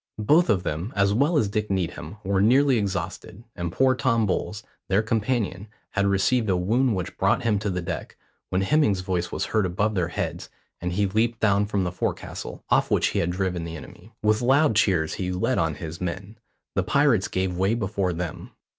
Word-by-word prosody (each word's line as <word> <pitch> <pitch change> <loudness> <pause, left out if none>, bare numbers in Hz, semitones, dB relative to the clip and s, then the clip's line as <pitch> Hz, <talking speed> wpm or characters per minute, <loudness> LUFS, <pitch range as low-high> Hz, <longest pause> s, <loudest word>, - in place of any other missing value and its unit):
Both 160 +8 +4
of 95 -3 +2
them, 85 +6 -3
as 100 0 +3
well 145 +8 +2
as 110 - +2
Dick 105 +1 -2
Needham, 95 -1 -3
were 95 0 +1
nearly 130 +3 +4
exhausted, 95 +1 -4
and 85 -1 -3
poor 130 +7 +3
Tom 120 -4 +1
Bowles, 105 +2 -2 0.2
their 100 +3 +2
companion, 110 -3 -1 0.2
had 100 -1 +1
received 100 +4 +2
a 95 - +2
wound 115 +6 +1
which 90 -2 -5
brought - - +2
him 105 -3 +2
to 105 - -2
the 90 -2 -2
deck, - - -5 0.3
when 95 - 0
Hemming's 105 -4 +2
voice 90 -2 -2
was - - -2
heard 110 -2 +1
above 100 +4 0
their 90 -4 0
heads, 85 - -4 0.3
and 90 0 -3
he 100 +3 +1
leaped 110 +4 0
down 100 -1 +2
from 100 -2 0
the 90 - -2
forecastle, 90 - -4
off - - +3
which - - +2
he - - -1
had 85 - 0
driven 90 -1 -2
the 80 0 -6
enemy. 95 +6 -13
With 110 +1 +3
loud 135 +1 +3
cheers 90 -7 +2
he 90 -1 -3
led 90 0 0
on - - 0
his 80 +2 -7
men; 95 +5 -5 0.3
the - - +1
pirates 140 -9 +2
gave 95 -1 -1
way 95 +5 +1
before 100 -4 -1
them. 85 -1 -5
100 Hz, 200 wpm, -25 LUFS, 90-110 Hz, 0.3 s, Both